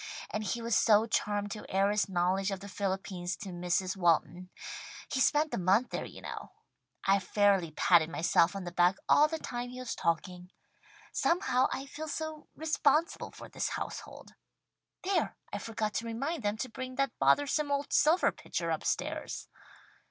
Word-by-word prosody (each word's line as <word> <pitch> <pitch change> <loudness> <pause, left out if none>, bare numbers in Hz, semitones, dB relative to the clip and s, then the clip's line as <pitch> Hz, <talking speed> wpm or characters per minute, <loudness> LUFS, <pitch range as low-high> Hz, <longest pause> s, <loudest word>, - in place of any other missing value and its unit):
And 215 - -2
he 230 +4 -2
was 230 -2 +1
so 215 -1 +5
charmed 205 -2 -1
to 210 - -7
air 195 +1 +2
his 210 -1 +1
knowledge 185 +2 +1
of 195 -2 -3
the 200 - -9
Philippines 190 -2 -3
to 200 - -7
Mrs. 180 +1 -1
Walton. 175 0 +1 0.6
He 265 - +1
spent 300 +3 +3
a - - 0
month 195 +7 +3
there - - -3
you - - -11
know. - - -7 0.5
I 195 +1 +5
fairly 195 -2 +2
patted 160 +1 +4
myself 170 +1 +3
on 195 - -4
the 175 - -5
back 175 +1 +4
all 300 - +6
the 320 +1 -3
time 245 -5 -5
he 250 +1 -8
was 255 -2 -4
talking. 180 +2 -2 0.6
Somehow 260 -7 +2
I 270 - -3
feel 310 +3 -7
so 315 0 -5
responsible 310 0 +1
for - - -11
this - - -2
household. - - -6 0.7
There! 385 +1 0 0.2
I - - -2
forgot 215 -2 -3
to 230 - -2
remind 275 +8 -2
them 205 0 -1
to 255 - -3
bring 255 +2 -6
that 275 0 +1
bothersome 290 +1 +3
old 280 0 -1
silver 330 +4 +4
pitcher - - -3
upstairs!" - - -2
210 Hz, 170 wpm, -31 LUFS, 185-275 Hz, 0.7 s, all